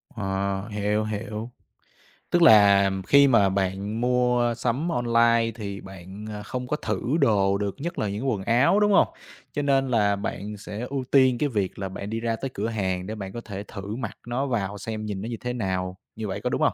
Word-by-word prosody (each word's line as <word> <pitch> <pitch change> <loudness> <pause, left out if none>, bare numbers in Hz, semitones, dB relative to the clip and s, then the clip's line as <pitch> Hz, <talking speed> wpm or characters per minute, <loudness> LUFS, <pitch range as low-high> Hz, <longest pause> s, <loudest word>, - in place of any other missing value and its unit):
Ờ, 95 -1 -2
hiểu, 105 0 0
hiểu. 110 +2 -5 0.8
Tức 175 - +2
là 100 -8 +7 0.2
khi 140 0 +7
mà 110 -7 +4
bạn 100 +3 -2
mua 125 -1 +2
sắm 125 +8 -1
online 115 -3 +3
thì 100 -3 -6
bạn, 95 +2 -10
ờ, 105 -1 -6
không 125 +4 -5
có 150 - 0
thử 105 -8 -3 0.2
đồ 100 -2 +3
được, 100 -1 -2
nhất 170 +3 -4
là 105 - 0
những 110 +7 -2
quần 105 -6 -1
áo, 120 - +4
đúng 210 0 +3
hông? 195 - +5 0.5
Cho 145 - -1
nên 135 -1 +2
là 105 -4 +3
bạn 105 +1 -5
sẽ 100 +1 -7
ưu 135 -1 -2
tiên 130 -3 +5
cái 145 +3 0
việc 100 -7 -2
là 95 -1 -3
bạn 100 +2 -6
đi 110 +1 -2
ra 115 0 -1
tới 135 +4 -4
cửa 105 +3 -2
hàng 95 -5 -2
để 110 - -4
bạn 95 -3 -6
có 120 - -5
thể 100 -3 -7
thử 100 +1 -7
mặc 115 -4 -5
nó 125 +3 -1
vào 105 -5 -2
xem 110 +1 -5
nhìn 100 -2 -4
nó 110 - -5
như 115 - -4
thế 125 0 -3
nào, 95 -5 -2 0.2
như 110 -1 -4
vậy 100 +1 -4
có 125 - -1
đúng - - -1
hông? - - +3
110 Hz, 220 wpm, -25 LUFS, 100-120 Hz, 0.8 s, là